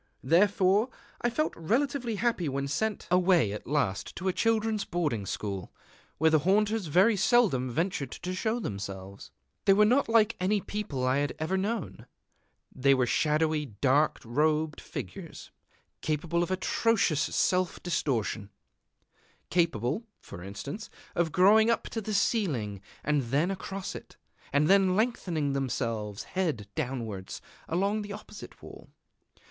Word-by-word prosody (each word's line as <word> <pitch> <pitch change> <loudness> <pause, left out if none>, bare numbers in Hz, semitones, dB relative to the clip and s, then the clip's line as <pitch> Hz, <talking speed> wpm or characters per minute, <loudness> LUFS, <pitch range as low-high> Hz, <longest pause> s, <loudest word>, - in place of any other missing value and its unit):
Therefore 195 - +3 0.3
I 240 - +2
felt 305 +6 -1
relatively 240 - 0
happy 205 -7 0
when 140 +1 -2
sent 210 +10 -2
away 180 - +4
at 105 - -7
last 130 -9 -1
to 190 - -4
a 185 - +2
children's 220 -1 +1
boarding 150 - -2
school, 100 -3 -4 0.5
where 160 +1 +4
the 155 - +5
haunters 205 +4 +1
very 190 +9 +4
seldom 195 - +3
ventured 155 0 -1
to 180 +7 -5
show 220 +5 -1
themselves. 100 - -6 0.4
They 195 - +7
were 210 +2 +5
not 250 +3 +3
like 225 -1 +4
any 200 +3 +2
people 195 -11 -4
that 130 - +2
I 130 - +2
had 145 0 -1
ever 160 +4 -1
known. 205 0 -3 0.7
They 135 +1 +4
were 130 -1 +2
shadowy 155 +3 +1
dark 135 +7 +2
robed 150 +5 +1
figures, - - -8 0.5
capable 160 +3 -1
of 175 - -1
atrocious 190 -3 +1
self 180 +2 0
distortion, 115 - -1 1.0
capable, 165 - 0
for 85 - -10
instance, 140 - -7 0.2
of 170 -2 0
growing 210 +5 +5
up 230 - +1
to 225 - -3
the 215 0 -3
ceiling, 135 - 0 0.2
and 150 -1 +2
then 145 +10 +1
across 195 0 -5
it, - - -11 0.3
and 145 +2 +3
then 190 -1 +4
lengthening 180 - 0
themselves, 115 -6 -2
head 155 - -2
downwards, 115 -10 -4 0.3
along 200 +5 +1
the 205 -1 -6
opposite 210 0 -11
wall. - - -12
170 Hz, 140 wpm, -29 LUFS, 135-205 Hz, 1.0 s, They